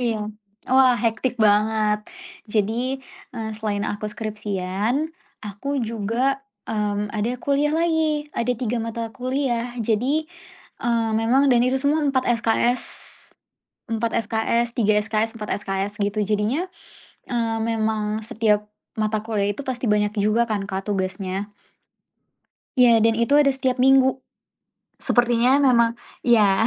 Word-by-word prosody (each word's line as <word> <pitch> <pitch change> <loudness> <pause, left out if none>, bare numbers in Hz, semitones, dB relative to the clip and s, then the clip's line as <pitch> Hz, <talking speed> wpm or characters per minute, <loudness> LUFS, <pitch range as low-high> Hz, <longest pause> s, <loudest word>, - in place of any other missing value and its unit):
iya. 220 -3 -1 0.4
Wah, 260 -1 +5
hectic 235 +2 -1
banget. 210 -1 +2 0.4
Jadi, 230 +5 0 0.4
eee, 220 -1 -3
selain 210 -1 -2
aku 210 0 -3
skripsian 210 - -2 0.3
aku 210 +8 -4
juga, 230 +4 -1 0.3
mmm, 210 -1 -2
ada 225 +4 -1
kuliah 285 +3 +1
lagi. 320 -3 +1
Ada 240 +1 0
3 240 -1 -1
mata 230 0 -4
kuliah. 250 -2 -2
Jadi, 245 +8 +1 0.6
eee, 230 -1 +1
memang 235 +5 +3
dan 240 - +4
itu 255 +2 +2
semua 290 +3 +1
4 270 -3 +1 0.2
SKS. 235 +2 +2 1.1
4 225 0 0
SKS, 230 +2 0
3 215 -3 +3
SKS, 220 +1 -1
4 210 - -5 0.2
SKS 195 +1 -2
gitu. 205 +1 -1
Jadinya, 215 - 0 0.6
eee, 230 -2 -1
memang 220 -1 -1
setiap 210 -1 +1 0.3
mata 215 0 0
kuliah 210 -3 0
itu 205 - -8
pasti 255 -1 -3
banyak 210 0 +2
juga 215 +3 +3
kan, 205 -2 -1
Kak, 190 +1 -4
tugasnya. 190 +1 -3 1.3
Ya, 235 -3 +6
dan 225 0 +3
itu 235 +5 +3
ada 290 -2 +5
setiap 260 -1 0
minggu. 265 0 +5 0.9
Sepertinya 245 +3 +3
memang 235 -3 +4 0.3
ya 215 -3 +4
225 Hz, 125 wpm, -23 LUFS, 210-250 Hz, 1.3 s, Ya